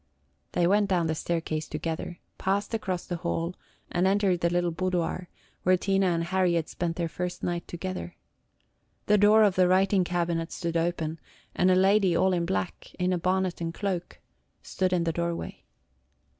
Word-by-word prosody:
They 175 - +2
went 205 +3 +3
down 175 -3 +2
the 160 - 0
staircase 160 -1 -2
together, 160 +2 -4 0.2
passed 200 +3 -1
across 190 -5 -2
the 175 - -3
hall, 170 +1 -2 0.4
and 180 +2 +2
entered 195 -2 +2
the 170 - +3
little 175 0 +1
boudoir, 180 0 -2 0.3
where 185 0 +4
Tina 195 +1 +1
and 170 -2 +1
Harry 180 0 +1
had 165 -2 0
spent 170 -2 -3
their 170 -1 -1
first 180 +2 -5
night 175 -1 -2
together. 185 0 -5 0.9
The 210 0 +4
door 210 +2 +6
of 205 -3 +4
the 185 0 +4
writing 190 +1 +3
cabinet 170 -1 -1
stood 170 -2 -3
open, 165 -1 -1 0.3
and 180 - +3
a 185 - +5
lady 190 -1 +4
all 190 0 +3
in 170 -1 0
black, 95 -1 -3
in 185 0 +1
a 180 - 0
bonnet 185 0 0
and 165 0 -3
cloak, 185 -4 -3 0.4
stood 185 -1 -1
in 180 -2 +2
the 165 -1 0
doorway. 170 0 -4
180 Hz, 175 wpm, -27 LUFS, 170-190 Hz, 0.9 s, door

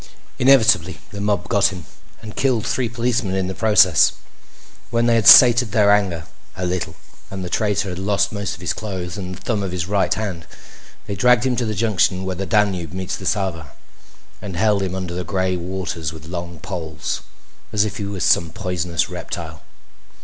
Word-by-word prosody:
Inevitably 110 -10 +4
the 100 - -6
mob 100 -4 -1
got 100 +1 +3
him 90 -5 -7 0.4
and 105 -1 -9
killed 125 -5 +1
three 125 -3 -1
policemen 115 -4 -1
in 95 -1 0
the 95 - -4
process. 95 - +4 0.8
When 115 0 +1
they 120 - +3
had 115 -3 +2
sated 120 -3 +8
their 105 -2 +4
anger 95 -6 +1 0.3
a 90 - -2
little 90 -2 -3 0.3
and 95 -1 -6
the 90 - -7
traitor 100 -2 0
had 90 0 -5
lost 100 0 0
most 100 -2 -4
of 85 - -15
his 90 - -1
clothes 95 -5 -5
and 95 -2 -6
the 95 - -14
thumb 110 -4 -1
of 95 -2 -3
his 90 -1 -3
right 100 0 0
hand, 95 -7 -3 0.6
they 100 - -4
dragged 125 +5 +3
him 130 -1 +1
to 120 - 0
the 110 - -2
junction 95 -3 +1
where 95 -1 -3
the 95 +1 -4
Danube 95 -7 0
meets 95 0 -3
the 95 - -6
Sava 85 -8 -2 0.7
and 95 -4 -6
held 105 0 +2
him 95 -1 -3
under 90 -2 -4
the 90 +1 -3
gray 95 0 -1
waters 85 -3 -4
with 80 -1 -11
long 85 -1 -6
poles, 80 -4 -5 0.5
as 105 0 +2
if 110 - -5
he 105 - -4
was 100 -2 -4
some 85 - +3
poisonous 90 -4 -2
reptile. - - -7
95 Hz, 195 wpm, -20 LUFS, 90-105 Hz, 0.8 s, sated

